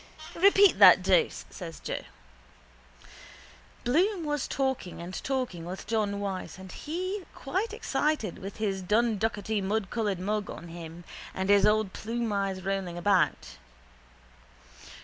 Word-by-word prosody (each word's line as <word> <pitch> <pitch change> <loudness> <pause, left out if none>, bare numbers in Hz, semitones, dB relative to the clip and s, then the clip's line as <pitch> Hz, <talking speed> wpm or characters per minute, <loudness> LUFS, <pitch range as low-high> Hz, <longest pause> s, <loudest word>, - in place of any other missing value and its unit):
—Repeat 395 +2 +5
that - - +9
dose, 475 -3 +2
says 170 -3 -8
Joe. - - -4 1.8
Bloom 345 - +2
was 295 -2 -1
talking 265 -9 -2
and 175 +2 -7
talking 255 -11 -2
with 180 +3 -6
John 210 -2 0
Wyse 195 -2 -4
and 190 -1 -10
he 370 - -4
quite 380 +11 -2
excited 305 - -1
with 195 0 -7
his 200 -3 -1
dunducketymudcoloured 210 -1 0
mug 205 +2 -2
on 170 - -8
him 165 0 -9 0.3
and 190 +1 -2
his 205 0 +6
old 215 -2 +2
plumeyes 200 -5 -2
rolling 190 -3 -2
about. 175 - +1
210 Hz, 115 wpm, -28 LUFS, 190-265 Hz, 1.8 s, that